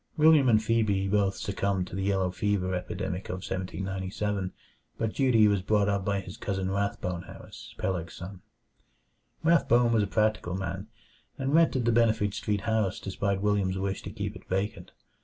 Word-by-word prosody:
William 155 -4 +6
and 110 -1 +4
Phebe 110 -4 +1
both 100 -1 +2
succumbed 100 -2 -1
to 90 - -8
the 95 - -2
yellow 95 -2 +1
fever 95 -1 0
epidemic 90 +1 -4
of - - -2
1797, 95 +1 -3 0.5
but 110 -1 -1
Dutee 120 -5 +4
was 100 -2 +2
brought 100 +1 +2
up 100 -1 0
by 100 0 0
his 90 0 -10
cousin 95 -2 -2
Rathbone 95 -3 -2
Harris, - - -11
Peleg's 85 -3 -3
son. 95 +1 -8 1.0
Rathbone 125 -8 +4
was 110 - +4
a 100 - 0
practical 105 -4 0
man, 95 +1 -4 0.5
and 135 +1 -1
rented 160 -7 +4
the 120 - +4
Benefit 110 -3 +2
Street 105 -1 -1
house 110 -3 0
despite 100 0 -2
William's 100 -2 +1
wish 95 0 -2
to - - -7
keep - - -5
it - - -13
vacant. 95 +3 -2
100 Hz, 165 wpm, -28 LUFS, 95-110 Hz, 1.0 s, William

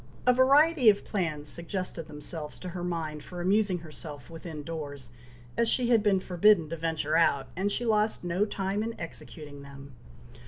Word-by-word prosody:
A 250 - +6
variety 275 +1 +5
of 205 -1 +2
plans 155 -7 -2
suggested 170 0 -3
themselves 150 0 -6
to 180 - -7
her 175 0 -5
mind 160 -4 -3
for 180 - -8
amusing 195 +1 +2
herself 150 -2 -8
within 160 -2 -7
doors, 145 -6 -7 0.4
as 235 -1 +2
she 245 0 +2
had 230 -3 +5
been 205 -2 +3
forbidden 180 -2 +3
to 165 - -3
venture 160 -1 -1
out, 140 -5 +2
and 195 +4 0
she 240 - -1
lost 215 -2 +1
no 175 +3 +1
time 200 -1 -2
in 225 +1 -4
executing 150 -3 -8
them. 140 -1 -12
175 Hz, 170 wpm, -29 LUFS, 155-210 Hz, 0.4 s, A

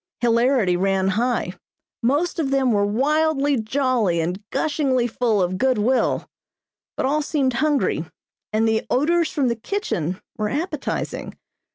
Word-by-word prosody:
Hilarity 235 -4 +3
ran 190 +1 +1
high. 240 +5 0 0.5
Most 290 +9 0
of 290 -4 0
them 270 -2 +2
were 205 -2 +2
wildly 285 +3 +1
jolly 230 -6 +1
and 175 +4 -2
gushingly 275 -5 0
full 225 -4 +1
of 185 +1 -2
good 260 0 +2
will; 245 +5 +1 0.7
but - - 0
all 295 +3 +1
seemed 280 -4 0
hungry, 300 -2 +1 0.5
and 220 +1 +2
the 220 0 +1
odors 330 +5 +2
from 285 -7 0
the 235 - +1
kitchen 215 - -3 0.2
were 210 0 0
appetizing. 300 - -3
250 Hz, 140 wpm, -22 LUFS, 215-290 Hz, 0.7 s, Hilarity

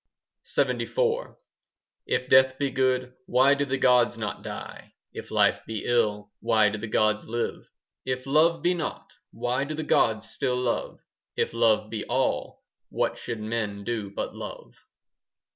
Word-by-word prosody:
LXXIV - - 0 0.7
If 130 - 0
death 130 0 +5
be 140 -1 -1
good, 130 -1 +1
Why 130 +3 +5
do 145 0 0
the 135 0 -1
gods 125 -2 +4
not 105 -4 -4
die? - - -8 0.2
If - - -8
life - - +3
be 110 -3 -4
ill, 105 -4 +1
Why 110 -2 +3
do 110 +1 -5
the 110 - -5
gods 110 0 +2
still - - -13
live? - - -6 0.3
If 130 0 -3
love 155 +4 +3
be 180 - +3
naught, 175 - -5
5 - - -27
Why 125 +3 -1
do 155 +2 -4
the 155 - -3
gods 110 -6 +2
still 125 +2 -1
love? 125 -2 -2 0.3
If - - -1
love 110 -2 +2
be 110 -2 -3
all, 130 +2 -1 0.3
What - - -1
should 115 -2 -5
men 105 -2 -3
do 110 -2 -3
but 100 - -4
love? - - -8
120 Hz, 160 wpm, -26 LUFS, 110-130 Hz, 0.7 s, death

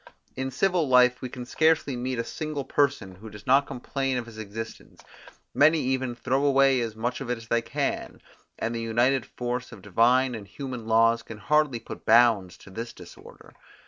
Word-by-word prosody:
In 130 0 -3
civil 175 +3 +1
life 125 0 +5
we 130 - -5
can 125 0 -8
scarcely 155 0 +2
meet 125 +1 -3
a 115 - -1
single 150 +2 -5
person 140 -9 0
who 105 +5 -11
does 105 0 -12
not 135 +2 +4
complain 135 +1 -3
of 120 - -3
his 115 -2 -11
existence; 110 +1 -8 0.5
many 155 +3 +5
even 130 -2 -1
throw 130 +3 -1
away 135 -2 +4
as 115 -2 -4
much 120 +4 -3
of 130 - -6
it 125 - -1
as 115 0 -13
they 115 - +2
can, - - -3 0.4
and 115 - -2
the 115 - -3
united 120 +4 +1
force 125 +1 -4
of 95 - -12
divine 120 +6 +3
and 105 -4 -7
human 125 +2 -7
laws 115 +1 +4
can 115 -2 -10
hardly 150 +2 +1
put - - -10
bounds 110 -6 +4
to 95 - -15
this 115 +4 -6
disorder. - - -14
125 Hz, 190 wpm, -26 LUFS, 115-135 Hz, 0.5 s, life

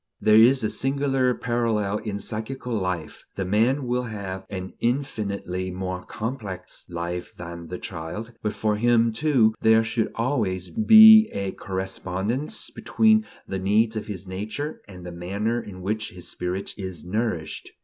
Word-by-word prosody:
There 110 +1 +6
is 130 +2 +5
a 110 - +1
singular 135 -1 +1
parallel 110 -4 0
in 105 -2 -4
psychical 115 +4 -4
life: 90 -7 -3
the 95 - -2
man 115 +8 +2
will 125 0 -1
have 95 -4 -6
an 95 -2 -6
infinitely 100 -8 -2
more 90 0 -4
complex 105 -6 -6
life 85 +1 -5
than 85 -1 -8
the 90 - -5
child; 95 +8 -6
but 105 - -1
for 105 -1 0
him, 115 0 +3
too, 120 -4 +3
there 110 0 +5
should 110 0 -1
always 110 -8 -1
be 220 0 +9
a 100 -1 -3
correspondence 95 - -3
between 220 -1 +3 0.2
the 95 - -3
needs 110 +4 +2
of 110 - -4
his 100 -3 -6
nature 105 +11 -5
and 90 -3 -11
the 90 - -6
manner 100 +7 -2
in 95 -4 -10
which 110 +3 -2
his 90 -1 -9
spirit 90 +2 -3
is 95 -4 -6
nourished. 90 -4 -3
105 Hz, 150 wpm, -25 LUFS, 95-120 Hz, 0.2 s, be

